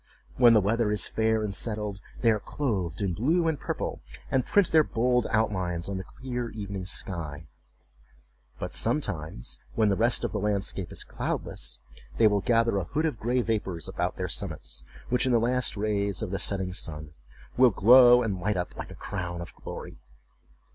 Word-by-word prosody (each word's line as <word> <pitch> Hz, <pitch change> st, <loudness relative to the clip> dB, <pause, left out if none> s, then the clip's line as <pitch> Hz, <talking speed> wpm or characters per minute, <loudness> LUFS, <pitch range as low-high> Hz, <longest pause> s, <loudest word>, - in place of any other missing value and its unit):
When 120 Hz, -2 st, +7 dB
the 110 Hz, -, +6 dB
weather 110 Hz, +3 st, +1 dB
is 105 Hz, 0 st, +2 dB
fair 110 Hz, 0 st, +1 dB
and 105 Hz, -2 st, -2 dB
settled, 105 Hz, -2 st, -2 dB, 0.2 s
they 115 Hz, -, +5 dB
are 105 Hz, -, +1 dB
clothed 100 Hz, -, -2 dB
in 95 Hz, -3 st, 0 dB
blue 160 Hz, -, +2 dB
and 160 Hz, -4 st, 0 dB
purple, -, -, -4 dB, 0.3 s
and 130 Hz, -1 st, +2 dB
print 200 Hz, +5 st, +3 dB
their 160 Hz, -1 st, +6 dB
bold 125 Hz, -2 st, +1 dB
outlines 95 Hz, -6 st, 0 dB
on 100 Hz, -1 st, -3 dB
the 95 Hz, -, -4 dB
clear 125 Hz, +1 st, -5 dB
evening 100 Hz, -4 st, -6 dB
sky, 80 Hz, -6 st, -4 dB, 1.1 s
but, -, -, -5 dB
sometimes, 90 Hz, -, -2 dB, 0.2 s
when 110 Hz, -2 st, +3 dB
the 100 Hz, -, +2 dB
rest 115 Hz, +4 st, +2 dB
of -, -, -1 dB
the 105 Hz, -, -2 dB
landscape 100 Hz, -3 st, -2 dB
is -, -, -4 dB
cloudless, -, -, -4 dB, 0.4 s
they -, -, +5 dB
will 105 Hz, -2 st, +4 dB
gather 115 Hz, -2 st, +2 dB
a 95 Hz, -, -1 dB
hood 155 Hz, -, -1 dB
of 150 Hz, -9 st, -2 dB
gray 125 Hz, +2 st, +1 dB
vapors 95 Hz, -8 st, -2 dB
about -, -, -2 dB
their -, -, -2 dB
summits, -, -, -3 dB, 0.3 s
which, 125 Hz, +1 st, +2 dB
in -, -, +2 dB
the 120 Hz, -, +4 dB
last 125 Hz, 0 st, 0 dB
rays 100 Hz, -1 st, 0 dB
of 100 Hz, -, -4 dB
the 100 Hz, -, -2 dB
setting 95 Hz, -3 st, -1 dB
sun, 75 Hz, -4 st, -5 dB, 0.4 s
will 130 Hz, 0 st, +6 dB
glow 120 Hz, +4 st, +7 dB
and 100 Hz, -5 st, -2 dB
light 105 Hz, +1 st, 0 dB
up 90 Hz, -, -3 dB
like -, -, -7 dB
a -, -, -9 dB
crown 85 Hz, -1 st, -5 dB
of 85 Hz, -, -7 dB
glory. -, -, -8 dB
105 Hz, 185 wpm, -27 LUFS, 95-120 Hz, 1.1 s, When